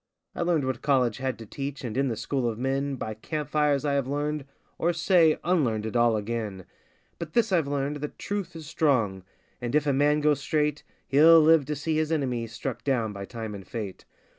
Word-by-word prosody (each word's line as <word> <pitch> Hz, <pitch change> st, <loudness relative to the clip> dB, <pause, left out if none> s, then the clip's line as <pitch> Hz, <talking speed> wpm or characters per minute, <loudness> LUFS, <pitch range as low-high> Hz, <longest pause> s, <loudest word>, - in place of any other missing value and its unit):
I -, -, -5 dB
learned 170 Hz, -5 st, +1 dB
what 130 Hz, -2 st, -2 dB
college 130 Hz, -6 st, +2 dB
had 130 Hz, -1 st, -2 dB
to 115 Hz, -, -9 dB
teach, 140 Hz, +5 st, -6 dB
and 115 Hz, -3 st, -4 dB
in 135 Hz, +1 st, +1 dB
the 115 Hz, -, -1 dB
school 130 Hz, 0 st, -1 dB
of 110 Hz, -, -5 dB
men 135 Hz, +2 st, -1 dB
By 110 Hz, -4 st, -4 dB
camp 150 Hz, +7 st, -5 dB
fires 150 Hz, -2 st, +2 dB
I 145 Hz, -, +1 dB
have 140 Hz, -2 st, 0 dB
learned, 145 Hz, +1 st, -2 dB, 0.3 s
or, 170 Hz, +1 st, +2 dB
say, 170 Hz, -2 st, +4 dB
unlearned 125 Hz, -12 st, +1 dB
it 110 Hz, -, -5 dB
all 120 Hz, -2 st, +4 dB
again; 105 Hz, -3 st, -4 dB, 0.5 s
But 160 Hz, -2 st, -6 dB
this 230 Hz, -3 st, +2 dB
I've 165 Hz, -6 st, +2 dB
learned, 140 Hz, +1 st, -1 dB
that 150 Hz, 0 st, -6 dB
truth 200 Hz, -4 st, -4 dB
is 160 Hz, -1 st, -8 dB
strong, 135 Hz, -, +1 dB, 0.4 s
and 120 Hz, +2 st, -2 dB
if 150 Hz, -1 st, +3 dB
a 140 Hz, -, +2 dB
man 145 Hz, +2 st, +3 dB
go 150 Hz, 0 st, +4 dB
straight 150 Hz, +1 st, -1 dB, 0.3 s
He'll 160 Hz, +4 st, +7 dB
live 160 Hz, -2 st, +5 dB
to 150 Hz, +2 st, -3 dB
see 155 Hz, +2 st, -1 dB
his 155 Hz, 0 st, 0 dB
enemy 125 Hz, -7 st, -1 dB
struck 115 Hz, +3 st, -5 dB
down 115 Hz, -6 st, 0 dB
by 100 Hz, -1 st, -6 dB
time 110 Hz, -1 st, -6 dB
and 95 Hz, -2 st, -9 dB
fate! 105 Hz, -5 st, -6 dB
140 Hz, 215 wpm, -27 LUFS, 120-150 Hz, 0.5 s, He'll